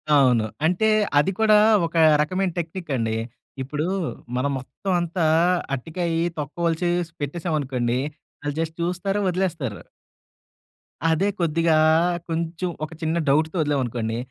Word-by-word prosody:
అవును. 125 Hz, -5 st, +4 dB, 0.2 s
అంటే 180 Hz, +6 st, +2 dB, 0.3 s
అది 180 Hz, +6 st, +2 dB
కూడా 215 Hz, -1 st, +6 dB, 0.3 s
ఒక 165 Hz, -, -14 dB, 0.3 s
రకమైన 185 Hz, +4 st, 0 dB
టెక్నిక్ 170 Hz, 0 st, -5 dB
అండి. 110 Hz, -2 st, -1 dB, 0.4 s
ఇప్పుడు 150 Hz, +4 st, -2 dB, 0.5 s
మనం 135 Hz, +3 st, 0 dB
మొత్తం 190 Hz, +9 st, -6 dB
అంతా 170 Hz, 0 st, -1 dB, 0.5 s
అరటికాయ 165 Hz, +5 st, -2 dB, 0.2 s
తొక్కవలిచేసి 170 Hz, +3 st, -1 dB
పెట్టేసాం 160 Hz, +3 st, -2 dB
అనుకోండి. 125 Hz, -3 st, -1 dB, 0.4 s
ఆల్లు 145 Hz, -1 st, -3 dB
జస్ట్ 160 Hz, 0 st, -4 dB
చూస్తారు. 190 Hz, +4 st, -1 dB
వదిలేస్తారు. 170 Hz, -, -2 dB, 1.3 s
అదే! 165 Hz, +5 st, +2 dB
కొద్దిగా 165 Hz, -1 st, +2 dB, 0.5 s
కొంచెం 165 Hz, +2 st, -2 dB, 0.2 s
ఒక 155 Hz, -, -14 dB
చిన్న 160 Hz, +1 st, 0 dB
డౌట్‌తో 155 Hz, +4 st, +2 dB
వదిలాం 145 Hz, -2 st, +1 dB
అనుకోండి. 115 Hz, -1 st, -3 dB
160 Hz, 115 wpm, -23 LUFS, 140-175 Hz, 1.3 s, కూడా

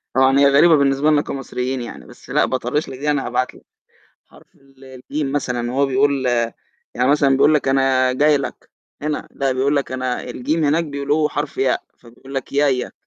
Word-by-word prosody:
طبعًا 130 Hz, +1 st, +4 dB
هي 140 Hz, -, +6 dB
غريبة 160 Hz, +4 st, +6 dB
بالنسبة 140 Hz, +1 st, +2 dB
لنا 145 Hz, -1 st, +3 dB
كمصريين 130 Hz, -2 st, -4 dB
يعني، 120 Hz, -, -9 dB
بس -, -, -16 dB
لأ، -, -, +2 dB
باطرِّش 130 Hz, +4 st, -2 dB
لك 130 Hz, -, -8 dB
دي -, -, -11 dB
يعني 145 Hz, -2 st, +1 dB
هابعت 125 Hz, +1 st, -2 dB
لك -, -, -19 dB, 0.6 s
حرف -, -, -21 dB
ال 135 Hz, -1 st, -21 dB
الجيم 135 Hz, +2 st, -5 dB
مثلًا 125 Hz, -4 st, -2 dB
وهو 140 Hz, +2 st, +2 dB
بيقول 135 Hz, 0 st, +1 dB, 0.7 s
يعني 125 Hz, +1 st, +1 dB
مثلًا 145 Hz, -2 st, +3 dB
بيقول 150 Hz, +3 st, +4 dB
لك 145 Hz, -2 st, +1 dB
أنا 135 Hz, -1 st, +2 dB
جاي 150 Hz, +3 st, +3 dB
لك 140 Hz, -, -7 dB, 0.3 s
هنا 150 Hz, 0 st, -3 dB
لأ، 135 Hz, -1 st, -1 dB
بيقول 135 Hz, +3 st, 0 dB
لك 140 Hz, -2 st, -2 dB
أنا 130 Hz, -1 st, -2 dB
الجيم 140 Hz, +6 st, -2 dB
هناك 155 Hz, +3 st, +2 dB
بيقولوه 145 Hz, +1 st, 0 dB
حرف 145 Hz, 0 st, -4 dB
ياء 135 Hz, -1 st, +1 dB, 0.2 s
فبيقول 125 Hz, +3 st, -14 dB
لك 135 Hz, -, -4 dB
يايا. 140 Hz, -3 st, +1 dB
135 Hz, 190 wpm, -20 LUFS, 130-145 Hz, 0.7 s, هي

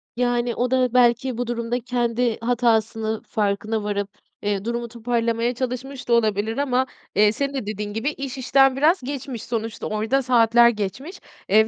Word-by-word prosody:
Yani 240 Hz, -1 st, 0 dB
o 250 Hz, +1 st, -1 dB
da 255 Hz, -2 st, +2 dB
belki 245 Hz, 0 st, +3 dB
bu 245 Hz, -, -2 dB
durumda 235 Hz, 0 st, -2 dB
kendi 240 Hz, -1 st, -1 dB
hatasını 225 Hz, -2 st, 0 dB
farkına 210 Hz, +1 st, -1 dB
varıp, 205 Hz, -1 st, -2 dB, 0.3 s
eee, 205 Hz, -1 st, -2 dB
durumu 235 Hz, 0 st, -2 dB
toparlamaya 235 Hz, 0 st, -1 dB
çalışmış 255 Hz, +2 st, -5 dB
da 240 Hz, -, +2 dB
olabilir 220 Hz, -1 st, +1 dB
ama, 260 Hz, -2 st, +1 dB, 0.3 s
eee, 210 Hz, +1 st, +5 dB
senin 280 Hz, +4 st, -2 dB
de 265 Hz, -6 st, -3 dB
dediğin 210 Hz, 0 st, -4 dB
gibi 225 Hz, +6 st, -1 dB
iş 275 Hz, -2 st, -6 dB
işten 270 Hz, +1 st, +4 dB
biraz 310 Hz, +7 st, +3 dB
geçmiş. 260 Hz, -3 st, -5 dB
Sonuçta 225 Hz, -1 st, -4 dB
orada 220 Hz, +6 st, 0 dB
saatler 235 Hz, -2 st, +5 dB
geçmiş, 235 Hz, -, -5 dB, 0.3 s
eee, 220 Hz, +2 st, +5 dB
235 Hz, 160 wpm, -23 LUFS, 220-255 Hz, 0.3 s, eee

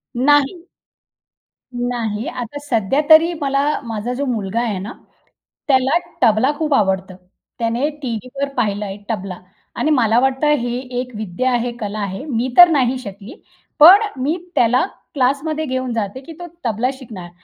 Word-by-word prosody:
नाही. 290 Hz, +7 st, +2 dB, 1.1 s
नाही, 240 Hz, -3 st, -3 dB
आता 255 Hz, -3 st, -6 dB
सध्या 230 Hz, +4 st, +1 dB
तरी 320 Hz, +2 st, +7 dB
मला 280 Hz, +2 st, 0 dB
माझा 225 Hz, +1 st, -4 dB
जो 280 Hz, +3 st, -2 dB
मुलगा 225 Hz, -4 st, -2 dB
आहे 220 Hz, -5 st, -2 dB
ना, 205 Hz, +6 st, -6 dB, 0.8 s
त्याला 265 Hz, +3 st, +3 dB, 0.2 s
तबला 235 Hz, +3 st, +4 dB
खूप 310 Hz, -3 st, 0 dB
आवडतं. 190 Hz, -4 st, 0 dB, 0.4 s
त्याने 235 Hz, +5 st, 0 dB
टीव्हीवर 255 Hz, +3 st, -4 dB
पाहिलं 205 Hz, 0 st, 0 dB
आहे 195 Hz, +1 st, -6 dB
तबला. 195 Hz, -5 st, -4 dB, 0.4 s
आणि 310 Hz, -, 0 dB
मला 230 Hz, -4 st, +3 dB
वाटतं 265 Hz, +3 st, +1 dB
हे 240 Hz, 0 st, -2 dB, 0.2 s
एक 255 Hz, 0 st, -5 dB
विद्या 215 Hz, +4 st, -2 dB
आहे, 245 Hz, 0 st, 0 dB
कला 215 Hz, -2 st, -5 dB
आहे. 200 Hz, +5 st, -4 dB
मी 250 Hz, -3 st, -2 dB
तर 355 Hz, 0 st, +11 dB
नाही 260 Hz, -5 st, +1 dB
शिकली. 200 Hz, +1 st, -9 dB, 0.5 s
पण 365 Hz, +7 st, +9 dB, 0.2 s
मी 305 Hz, +7 st, 0 dB, 0.2 s
त्याला 245 Hz, +7 st, +3 dB, 0.3 s
क्लासमध्ये 290 Hz, +3 st, 0 dB
घेऊन 255 Hz, -3 st, -3 dB
जाते 220 Hz, +2 st, -3 dB
की 325 Hz, +4 st, -11 dB
तो 350 Hz, -, -7 dB, 0.2 s
तबला 230 Hz, +2 st, 0 dB
शिकणार. 220 Hz, -10 st, -10 dB
245 Hz, 150 wpm, -19 LUFS, 220-280 Hz, 1.1 s, तर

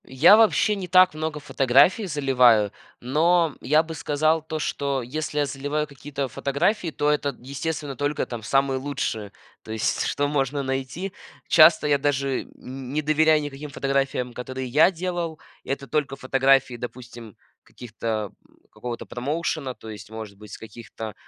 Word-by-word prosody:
Я 140 Hz, +10 st, +6 dB
вообще 220 Hz, -1 st, +4 dB
не 190 Hz, -2 st, -5 dB
так 185 Hz, -1 st, +6 dB
много 155 Hz, 0 st, -4 dB
фотографий 145 Hz, -, +3 dB
заливаю, 125 Hz, -, +3 dB, 0.3 s
но 160 Hz, +4 st, +2 dB
я 155 Hz, +3 st, +3 dB
бы 165 Hz, 0 st, -7 dB
сказал 155 Hz, +1 st, +1 dB
то, 160 Hz, 0 st, -5 dB
что 140 Hz, -2 st, -2 dB
если 150 Hz, +4 st, -4 dB
я 145 Hz, -, +3 dB
заливаю 145 Hz, +2 st, -2 dB
какие-то 140 Hz, -1 st, -5 dB
фотографии, 165 Hz, -, -1 dB
то 150 Hz, -1 st, 0 dB
это, 145 Hz, -2 st, -1 dB
естественно, 140 Hz, +2 st, -4 dB
только 145 Hz, +2 st, -1 dB
там 120 Hz, -2 st, -7 dB
самые 135 Hz, +3 st, +1 dB
лучшие, 115 Hz, -7 st, -3 dB, 0.3 s
то 110 Hz, -, -10 dB
есть, 110 Hz, -1 st, -1 dB
что 145 Hz, 0 st, 0 dB
можно 140 Hz, -1 st, -1 dB
найти. 135 Hz, +8 st, -4 dB, 0.3 s
Часто 160 Hz, -1 st, +6 dB
я 145 Hz, -1 st, +3 dB
даже 140 Hz, -1 st, -1 dB
нь -, -, -20 dB, 0.4 s
не 155 Hz, -, 0 dB
доверяю 155 Hz, 0 st, +3 dB
никаким 145 Hz, +1 st, -7 dB
фотографиям, 135 Hz, -2 st, -1 dB
которые 130 Hz, +1 st, -5 dB
я 150 Hz, +8 st, +5 dB
делал. 175 Hz, -3 st, -4 dB, 0.2 s
Это 140 Hz, 0 st, -4 dB
только 150 Hz, -2 st, -1 dB
фотографии, 135 Hz, -1 st, +2 dB
допустим, 120 Hz, -3 st, -9 dB, 0.2 s
каких-то, 110 Hz, -3 st, -5 dB, 0.2 s
м, -, -, -26 dB, 0.2 s
какого-то 120 Hz, -1 st, -6 dB
промоушена, 140 Hz, 0 st, -3 dB
то 110 Hz, -, -11 dB
есть, 105 Hz, 0 st, -10 dB
может 110 Hz, -2 st, -8 dB
быть, 105 Hz, 0 st, -13 dB
с -, -, -7 dB
каких-то, 110 Hz, 0 st, -9 dB
140 Hz, 155 wpm, -24 LUFS, 125-155 Hz, 0.4 s, Я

